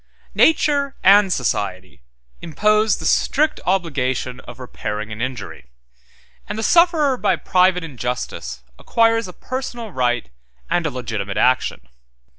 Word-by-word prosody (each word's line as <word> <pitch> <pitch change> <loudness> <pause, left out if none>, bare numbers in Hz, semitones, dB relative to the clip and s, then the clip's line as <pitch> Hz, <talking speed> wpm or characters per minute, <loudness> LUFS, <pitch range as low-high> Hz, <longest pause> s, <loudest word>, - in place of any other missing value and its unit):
Nature 285 -3 +2
and 195 0 +6
society 95 - -2 0.4
impose 210 +6 +2
the - - -8
strict 305 +2 +1
obligation 135 -8 -1
of 125 - -12
repairing 110 -4 -5
an 105 +2 -6
injury; 95 - -6 0.8
and - - -4
the 220 - -3
sufferer 330 - +4
by - - +1
private 180 -1 +2
injustice 125 - -5 0.2
acquires 225 -2 +2
a - - -8
personal 240 -3 -6
right 120 - -1 0.4
and 175 -1 +1
a - - -1
legitimate 110 -6 -5
action. 125 - +1
160 Hz, 120 wpm, -20 LUFS, -, 0.8 s, and